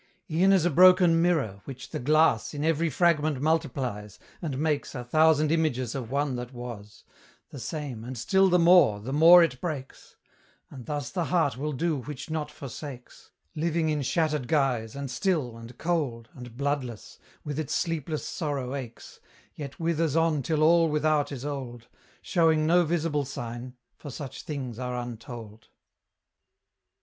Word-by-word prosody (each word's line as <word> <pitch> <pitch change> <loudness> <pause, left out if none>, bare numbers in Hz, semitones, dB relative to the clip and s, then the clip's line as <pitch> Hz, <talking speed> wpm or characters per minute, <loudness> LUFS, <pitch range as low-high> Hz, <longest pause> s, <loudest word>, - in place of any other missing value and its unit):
E'en 180 +5 +4
as 190 -4 +4
a 175 - +2
broken 180 0 +6
mirror, 140 - 0
which 130 -2 -9
the - - -3
glass 155 +3 +2
In 145 +1 -2
every 165 +1 +1
fragment 155 -2 +2
multiplies; 130 - -2 0.2
and 150 -6 -3
makes 150 -1 -1
A 125 - -4
thousand 155 +3 +3
images 140 -8 0
of 125 -5 -5
one 140 -1 -1
that 125 0 -6
was, 115 -4 -9 0.5
The 140 - -8
same, 135 -3 -5
and 125 +1 -7
still 190 - +3
the 180 - +4
more, 170 - +5
the 125 +6 -6
more 170 +4 +8
it 130 -6 -2
breaks; 145 -6 -6 0.6
And 130 -4 -10
thus 145 -5 -3
the 175 -3 -1
heart 165 -6 +1
will 150 +4 -3
do 155 +2 -1
which 145 +3 -7
not 155 -2 -2
forsakes, 140 -2 -10 0.2
Living 165 0 0
in 150 -1 0
shattered 150 -1 0
guise, 125 -7 0
and 140 -2 -5
still, 145 - -1
and 115 +1 -11
cold, 140 -10 -2
And 120 -2 -11
bloodless, 140 -5 -3 0.2
with 145 0 -4
its 155 - -2
sleepless 160 -2 -2
sorrow 140 -6 -3
aches, 125 -5 -8 0.3
Yet 140 -2 -8
withers 165 -2 0
on 165 -3 +2
till 155 +2 0
all 165 +1 +5
without 150 -1 +1
is 135 -1 -6
old, 125 -5 -6 0.3
Showing 160 -3 +2
no 175 +2 +4
visible 155 -2 0
sign, 120 0 -7 0.2
for 145 - -9
such 135 0 -7
things 130 -6 -6
are 125 -1 -3
untold. 115 -2 -8
145 Hz, 160 wpm, -27 LUFS, 125-160 Hz, 0.6 s, more